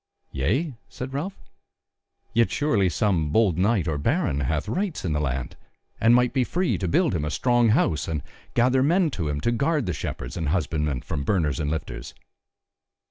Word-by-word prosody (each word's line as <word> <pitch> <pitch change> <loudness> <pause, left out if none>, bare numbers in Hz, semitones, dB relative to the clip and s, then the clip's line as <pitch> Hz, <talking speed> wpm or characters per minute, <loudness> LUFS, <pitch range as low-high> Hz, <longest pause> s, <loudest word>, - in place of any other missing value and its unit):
"Yea?" 110 - 0 0.2
said 130 +1 -7
Ralph, 170 +8 -3 1.0
"yet 115 0 +3
surely 110 -11 +1
some 85 -1 +1
bold 95 -1 +2
knight 100 -3 +2
or 75 -3 -1
baron 120 - +1
hath 75 +3 -1
rights 185 - -2
in 80 - 0
the 75 - 0
land, 65 -4 -2 0.4
and 115 +1 +5
might 125 0 +3
be 130 -2 +2
free 180 +7 0
to 95 - -1
build 160 - +2
him 80 -4 -1
a 75 - -1
strong 120 - +2
house 80 - +2
and 75 -4 -2 0.3
gather 130 +2 +3
men 165 +3 +3
to 80 - -3
him 75 0 -2
to 120 - +1
guard 140 +3 +1
the 90 - -1
shepherds 75 - -5
and 80 -4 -2
husbandmen 75 -5 -1
from 70 - -4
burners 75 -4 0
and 75 -2 -1
lifters." 65 -6 -5
95 Hz, 185 wpm, -25 LUFS, -, 1.0 s, and